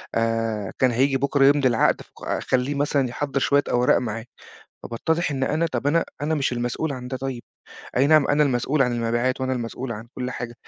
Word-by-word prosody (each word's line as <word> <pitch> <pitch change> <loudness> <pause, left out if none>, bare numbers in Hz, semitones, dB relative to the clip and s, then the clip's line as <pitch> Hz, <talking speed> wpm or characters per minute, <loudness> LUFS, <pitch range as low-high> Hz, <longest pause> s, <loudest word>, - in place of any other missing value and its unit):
آآ، 115 -3 -1
كان 130 -1 +4
هييجي 135 +3 +2
بُكرة 140 0 +2
يمضي 140 -1 +5
العقد 115 -2 +2
ف - - -16 0.3
خليّه 130 +2 +1
مثلًا 140 -2 +1
يحضّر 140 +2 -2
شوية 140 +1 +3
أوراق 125 +1 +3
معاه." 115 -1 -4 0.6
فباتضّح 160 +7 -1
إن 135 -1 -1
أنا 160 +4 +1
طَب 145 - -2
أنا 165 +3 +2 0.2
أنا 155 +2 0
مش 140 -3 0
المسؤول 120 +5 -2
عن 125 -1 -7
ده 130 0 -4
طيب، 130 -2 -5 0.5
أي 135 +2 +4
نَعَم 155 -2 +5
أنا 145 +1 +3
المسؤول 135 +2 +1
عن 125 -2 +1
المبيعات 120 +2 0
وأنا 130 0 -1
المسؤول 120 0 -4
عن 110 +2 -8
كل 125 0 -4
حاجة، 120 -1 -6
130 Hz, 195 wpm, -23 LUFS, 120-145 Hz, 0.6 s, يمضي